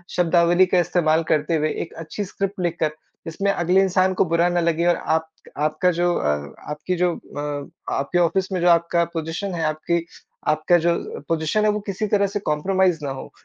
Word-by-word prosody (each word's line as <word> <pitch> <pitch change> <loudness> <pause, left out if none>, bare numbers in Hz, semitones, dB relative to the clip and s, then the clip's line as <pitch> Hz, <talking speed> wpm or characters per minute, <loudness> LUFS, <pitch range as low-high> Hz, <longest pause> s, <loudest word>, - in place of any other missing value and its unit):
शब्दावली 175 +1 +4
का 180 0 +2
इस्तेमाल 165 -2 +2
करते 155 +2 +1
हुए 155 0 +1
एक 165 - -12
अच्छी 165 +6 -5
स्क्रिप्ट 195 +1 -4
लिखकर, 165 -2 0 0.4
जिसमें 195 +5 0
अगले 180 0 +2
इंसान 185 0 +2
को 185 - +2
बुरा 170 +1 +2
ना 175 - +1
लगे 170 0 +1
और 175 - +4
आप 160 0 -1 0.3
आपका 155 +4 +1
जो 175 +1 +1
अ, 75 -1 -1 0.2
आपकी 150 +5 -3
जो 175 -1 +1
अ, 145 -1 -6 0.2
आपके 140 +6 -1
ऑफिस 185 +3 +1
में 185 - -1
जो 175 - +4
आपका 170 0 +3
पोज़ीशन 165 +4 -3
है 165 - -2
आपकी 155 +2 -1 0.4
आपका 155 +3 +3
जो 170 +1 +2 0.3
पोज़ीशन 165 +6 +1
है - - +4
वो 210 - -2
किसी 195 +2 -2
तरह 200 -1 +2
से 200 +1 -3
कॉम्प्रोमाइज़ 185 +1 +1
ना 135 - -2
हो। 135 - -8
170 Hz, 190 wpm, -22 LUFS, 160-185 Hz, 0.4 s, शब्दावली